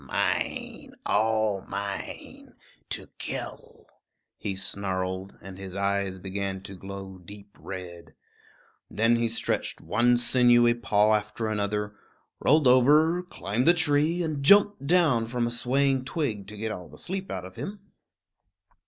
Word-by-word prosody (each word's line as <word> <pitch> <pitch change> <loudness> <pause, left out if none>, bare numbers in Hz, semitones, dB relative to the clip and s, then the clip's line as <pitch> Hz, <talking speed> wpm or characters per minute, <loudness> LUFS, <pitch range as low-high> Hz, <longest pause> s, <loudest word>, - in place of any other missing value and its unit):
"Mine, - - -2
all 110 -2 +1
mine 100 0 -6 0.4
to - - -3
kill," - - -6 0.5
he 100 -2 -4
snarled, 95 -1 -3
and 95 0 -10
his 95 -1 -8
eyes 100 -1 -1
began 95 0 -4
to 100 - -9
glow 95 0 -8
deep 100 +3 -13
red. 90 -3 -9 0.7
Then 115 +3 +2
he 115 0 +1
stretched 115 0 -1
one 120 +1 +2
sinewy 120 -1 +4
paw 110 -2 +2
after 110 +1 -1
another, 105 0 -2 0.4
rolled 155 0 +4
over, 150 +7 +5
climbed 125 - -2
a 175 - +7
tree, 160 +1 +2
and 155 -4 -3
jumped 205 -1 +5
down 150 -10 +3
from 120 0 -1
a 120 - -2
swaying 130 +2 +1
twig 130 - -3
to 105 +1 -9
get 110 +2 -3 0.2
the - - -14
sleep 190 +1 -4
all - - -2
out 90 - -7
of 95 0 -11
him. 200 0 -6
110 Hz, 135 wpm, -27 LUFS, 100-135 Hz, 0.7 s, a